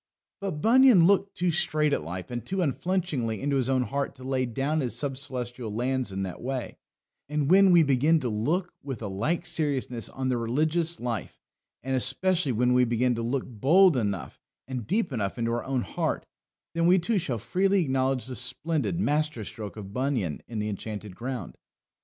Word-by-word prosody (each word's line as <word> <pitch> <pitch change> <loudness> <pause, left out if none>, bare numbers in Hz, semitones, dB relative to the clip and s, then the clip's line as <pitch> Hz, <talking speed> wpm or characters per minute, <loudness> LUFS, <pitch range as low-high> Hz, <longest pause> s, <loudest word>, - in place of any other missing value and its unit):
But 190 -7 -4
Bunyan 240 -6 +7
looked 195 +1 +2
too 180 0 +1
straight 155 -3 +1
at - - +1
life 90 +7 -6
and 120 -2 -4
too 190 +8 -1
unflinchingly 150 - -1
into 140 0 0
his 130 -1 0
own 130 -1 +2
heart 140 +2 -3
to 130 - -13
lay 130 -1 0
down 135 +6 -1
his 125 -7 -1
sub 140 -2 -1
Celestial 125 -4 -4
lands 125 +1 -1
in 95 0 -3
that 95 -2 -6
way; 130 0 -4 0.5
and 150 0 0
when 195 +1 +7
we 175 -2 +7
begin 145 +4 +3
to 130 - -2
look 150 - -1
with 135 -5 -6
a - - -2
like 145 - -1
seriousness 145 -8 -1
on 130 -1 -3
the 125 - +1
religious 155 +8 0
life, 120 -3 -4 0.5
and 135 +1 -1
especially 145 +5 +2
when 125 +2 +2
we 125 0 +5
begin 120 +1 +1
to 115 - -3
look 125 +3 -1
bold 155 - +4
enough 100 -7 -2 0.3
and 130 -4 -5
deep 185 -4 0
enough 100 -3 -2
into 115 -1 -1
our 120 0 -2
own 130 -2 -1
heart, - - -2 0.5
then 170 0 +2
we 180 +2 +6
too 200 +4 +1
shall 140 -9 -2
freely 190 - +1
acknowledge 130 -2 0
the 130 -1 -5
splendid 155 +7 0
master 150 - 0
stroke 110 0 -7
of 100 -2 -8
Bunyan 125 - -1
in 115 - -6
the 105 0 -1
Enchanted 105 -1 -6
Ground. 125 -5 -6
130 Hz, 190 wpm, -27 LUFS, 120-165 Hz, 0.5 s, Bunyan